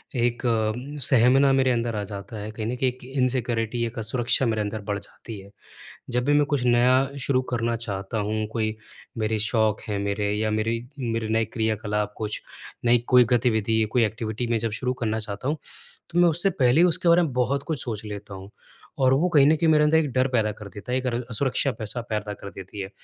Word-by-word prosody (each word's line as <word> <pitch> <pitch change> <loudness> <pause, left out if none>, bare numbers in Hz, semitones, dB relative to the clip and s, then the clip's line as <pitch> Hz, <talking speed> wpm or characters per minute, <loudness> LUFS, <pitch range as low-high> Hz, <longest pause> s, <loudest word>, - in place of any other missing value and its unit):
एक 120 +1 0 0.6
सहमना 130 +2 +5
मेरे 130 -1 +3
अंदर 115 -2 -1
आ 105 - -2
जाता 100 +2 -8
है, 105 +1 -6
कहीं 110 0 -5
न 125 - -2
कहीं 130 - +2
एक 125 0 -11
इनसिक्योरिटी 125 -3 -1
एक 115 +2 -6
असुरक्षा 120 +3 +1
मेरे 110 -2 0
अंदर 105 +1 -3
बढ़ 100 0 -3
जाती 105 +1 -11
है। 95 +1 -13 0.6
जब 125 +1 0
भी 145 - +3
मैं 145 0 +4
कुछ 145 -4 0
नया 130 +3 +3
शुरू 130 0 +2
करना 115 0 0
चाहता 100 -1 -4
हूँ, 110 +1 -1
कोई 110 -1 -1 0.4
मेरे 110 0 0
शौक 110 0 +1
हैं 100 -1 -1
मेरे 100 +1 -1
या 110 +1 0
मेरी 110 +2 0 0.2
मेरे 115 -3 -2
नए 110 0 +2
क्रियाकलाप 110 -2 -2
कुछ, 105 -1 -4 0.4
नई 120 +1 +5
कोई 125 -1 +6
गतिविधि 110 -2 +2
या 110 - +1
कोई 120 -2 +3
एक्टिविटी 110 +2 -3
मैं 115 - +3
जब 115 0 -2
शुरू 125 0 0
करना 110 0 0
चाहता 105 +2 -5
हूँ 150 +2 0 0.5
तो 170 - 0
मैं 175 -1 +6
उससे 175 +5 +2
पहले 125 +6 +5
ही 180 - +6
उसके 170 0 +2
बारे 170 +1 +6
में 150 - -2
बहुत 135 +3 0
कुछ 155 -6 -2
सोच 110 -4 -5
लेता 105 -1 -7
हूँ। 95 +1 -10 0.5
और 130 0 +5
वो 160 +7 +3
कहीं 145 -5 +5
न 155 - +5
कहीं 165 +1 +1
मेरे 150 -1 +5
अंदर 155 +1 +4
एक 155 -3 +1
डर 130 +1 +2
पैदा 110 -4 +1
कर 105 0 -10
देता 105 +4 -8
है - - +2
एक 130 - -7
र 120 0 -1
सुरक्षा 135 +2 +1
पैसा 110 +2 -3
पैदा 105 -1 -2
कर 100 - -9
देती 95 +1 -8
है। 95 - -5
115 Hz, 220 wpm, -25 LUFS, 110-130 Hz, 0.6 s, कोई